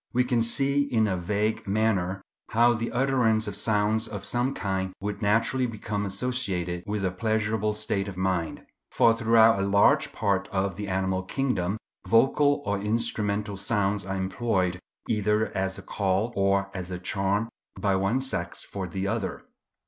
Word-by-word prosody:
We 125 Hz, +1 st, +3 dB
can 125 Hz, -2 st, +1 dB
see 140 Hz, +4 st, +4 dB
in 110 Hz, -3 st, +3 dB
a 95 Hz, -, 0 dB
vague 105 Hz, +5 st, -1 dB
manner 100 Hz, -2 st, 0 dB, 0.3 s
how 120 Hz, +2 st, +4 dB
the 115 Hz, 0 st, -3 dB
utterance 120 Hz, -4 st, +2 dB
of 100 Hz, -, -4 dB
sounds 110 Hz, +1 st, +1 dB
of 105 Hz, -2 st, -6 dB
some 125 Hz, +3 st, 0 dB
kind 95 Hz, -2 st, -2 dB
would 105 Hz, +2 st, -4 dB
naturally 115 Hz, +5 st, +2 dB
become 105 Hz, -2 st, -3 dB
associated 95 Hz, -6 st, -2 dB
with 105 Hz, -1 st, -2 dB
a 90 Hz, -, 0 dB
pleasurable 110 Hz, +1 st, -1 dB
state 105 Hz, -2 st, -1 dB
of 95 Hz, -2 st, -7 dB
mind; 95 Hz, -3 st, -2 dB, 0.2 s
for 115 Hz, -, +4 dB
throughout 115 Hz, -1 st, +4 dB
a 100 Hz, -, 0 dB
large 100 Hz, +1 st, +4 dB
part 100 Hz, -3 st, 0 dB
of 95 Hz, -1 st, -1 dB
the 105 Hz, +2 st, -5 dB
animal 95 Hz, 0 st, 0 dB
kingdom 100 Hz, -3 st, -1 dB, 0.3 s
vocal 145 Hz, +7 st, +3 dB
or 100 Hz, 0 st, -1 dB
instrumental 105 Hz, -2 st, -1 dB
sounds 100 Hz, -1 st, 0 dB
are 95 Hz, +1 st, -4 dB
employed 95 Hz, -2 st, -1 dB, 0.3 s
either 105 Hz, 0 st, 0 dB
as 95 Hz, 0 st, -1 dB
a -, -, -9 dB
call 100 Hz, +4 st, -1 dB
or 100 Hz, 0 st, +1 dB
as 90 Hz, -1 st, -5 dB
a 90 Hz, -, -4 dB
charm 100 Hz, +4 st, -1 dB, 0.3 s
by 100 Hz, -2 st, +1 dB
one 95 Hz, +7 st, +1 dB
sex 135 Hz, 0 st, -3 dB
for 95 Hz, -2 st, -5 dB
the 95 Hz, +3 st, -4 dB
other. 110 Hz, -1 st, -3 dB
105 Hz, 165 wpm, -26 LUFS, 95-115 Hz, 0.3 s, see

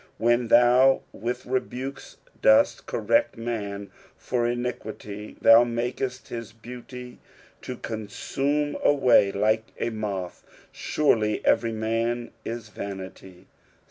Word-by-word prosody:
11 120 Hz, +1 st, +4 dB
When 120 Hz, -, -4 dB
thou 125 Hz, +3 st, +5 dB
with 120 Hz, +4 st, -4 dB
rebukes 130 Hz, +1 st, -4 dB, 0.2 s
dost -, -, +4 dB
correct 290 Hz, -, +1 dB
man 100 Hz, -4 st, -4 dB, 0.3 s
for 120 Hz, -2 st, -1 dB
iniquity, 110 Hz, -4 st, -5 dB
thou 115 Hz, +1 st, +8 dB
tnakest 125 Hz, +2 st, -3 dB
his 115 Hz, -1 st, -6 dB
beauty 125 Hz, +2 st, -10 dB, 0.4 s
to 125 Hz, -, -6 dB
consume 135 Hz, +7 st, -2 dB
away 125 Hz, -8 st, +5 dB
like 110 Hz, +2 st, +1 dB
a 120 Hz, -, -1 dB
moth; 100 Hz, -5 st, -4 dB, 0.3 s
surely 110 Hz, -8 st, +1 dB
every 115 Hz, -, +3 dB
man 115 Hz, +2 st, -1 dB
is 115 Hz, -2 st, -6 dB
vanity. 95 Hz, -2 st, -8 dB
120 Hz, 110 wpm, -25 LUFS, 110-125 Hz, 0.4 s, thou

